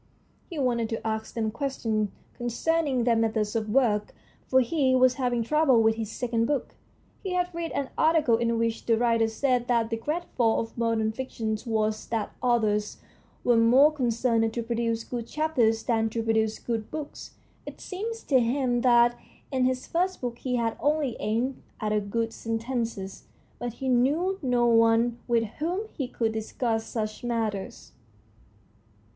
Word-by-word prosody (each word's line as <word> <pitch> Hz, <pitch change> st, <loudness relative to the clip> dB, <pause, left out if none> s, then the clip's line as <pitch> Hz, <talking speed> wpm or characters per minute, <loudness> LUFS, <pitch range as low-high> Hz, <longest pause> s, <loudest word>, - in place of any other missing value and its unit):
He 340 Hz, -, -7 dB
wanted 240 Hz, -5 st, 0 dB
to 225 Hz, -, -4 dB
ask 220 Hz, 0 st, -3 dB
them 220 Hz, -2 st, -1 dB
questions 225 Hz, -5 st, -1 dB, 0.3 s
concerning 265 Hz, +2 st, 0 dB
their 235 Hz, -1 st, +3 dB
methods 220 Hz, -2 st, 0 dB
of 220 Hz, -1 st, -1 dB
work, 210 Hz, -4 st, +1 dB, 0.3 s
for 260 Hz, -, +4 dB
he 260 Hz, 0 st, +2 dB
was 255 Hz, 0 st, +5 dB
having 245 Hz, -3 st, 0 dB
trouble 290 Hz, -1 st, +3 dB
with 220 Hz, 0 st, +4 dB
his 220 Hz, -1 st, -5 dB
second 230 Hz, -2 st, -1 dB
book. 290 Hz, -3 st, -2 dB, 0.5 s
He 380 Hz, -2 st, -3 dB
had 360 Hz, 0 st, 0 dB
read 335 Hz, 0 st, -4 dB
an 275 Hz, -2 st, -2 dB
article 315 Hz, -7 st, +4 dB
in 235 Hz, 0 st, 0 dB
which 230 Hz, 0 st, -1 dB
the 230 Hz, -1 st, +4 dB
writer 230 Hz, -1 st, +2 dB
said 245 Hz, +1 st, 0 dB
that 235 Hz, -2 st, +1 dB
the 225 Hz, -, 0 dB
great 305 Hz, +9 st, -2 dB
fault 225 Hz, -1 st, +1 dB
of -, -, -28 dB
modern 230 Hz, -2 st, 0 dB
fiction 225 Hz, -2 st, -3 dB
was 215 Hz, -1 st, -1 dB
that 225 Hz, -2 st, -2 dB
authors 215 Hz, -4 st, +1 dB, 0.5 s
were 240 Hz, -1 st, +4 dB
more 250 Hz, +6 st, +6 dB
concerned 235 Hz, -4 st, +1 dB
to 235 Hz, -, -1 dB
produce 230 Hz, 0 st, -1 dB
good 235 Hz, -2 st, -5 dB
chapters 240 Hz, -7 st, +1 dB
than 225 Hz, -2 st, +1 dB
to 225 Hz, +1 st, -3 dB
produce 220 Hz, -1 st, +1 dB
good 225 Hz, -3 st, -4 dB
books. 305 Hz, -2 st, -7 dB, 0.3 s
It -, -, -8 dB
seemed 425 Hz, +5 st, -4 dB
to 265 Hz, -3 st, +5 dB
him 245 Hz, 0 st, +1 dB
that 240 Hz, -1 st, +5 dB, 0.4 s
in 260 Hz, -2 st, +2 dB
his 255 Hz, 0 st, 0 dB
first 365 Hz, +2 st, -1 dB
book 240 Hz, -2 st, -4 dB
he 250 Hz, -1 st, -2 dB
had 230 Hz, -2 st, -1 dB
only 290 Hz, -4 st, +1 dB
aimed 235 Hz, +5 st, -1 dB, 0.2 s
at 210 Hz, -2 st, -1 dB
good 230 Hz, +1 st, -1 dB
sen 225 Hz, 0 st, -3 dB
tences, 230 Hz, -5 st, -4 dB, 0.3 s
but 240 Hz, -2 st, -4 dB
he 265 Hz, +2 st, -5 dB
knew 295 Hz, +10 st, +2 dB
no 245 Hz, -3 st, +2 dB
one 230 Hz, +1 st, +4 dB
with 235 Hz, -2 st, +2 dB, 0.2 s
whom 365 Hz, +8 st, -2 dB
he 270 Hz, -, -3 dB
could 230 Hz, -3 st, -1 dB
discuss 225 Hz, +1 st, -2 dB
such 215 Hz, -1 st, -4 dB
matters. 225 Hz, -5 st, -3 dB
235 Hz, 165 wpm, -27 LUFS, 225-260 Hz, 0.5 s, more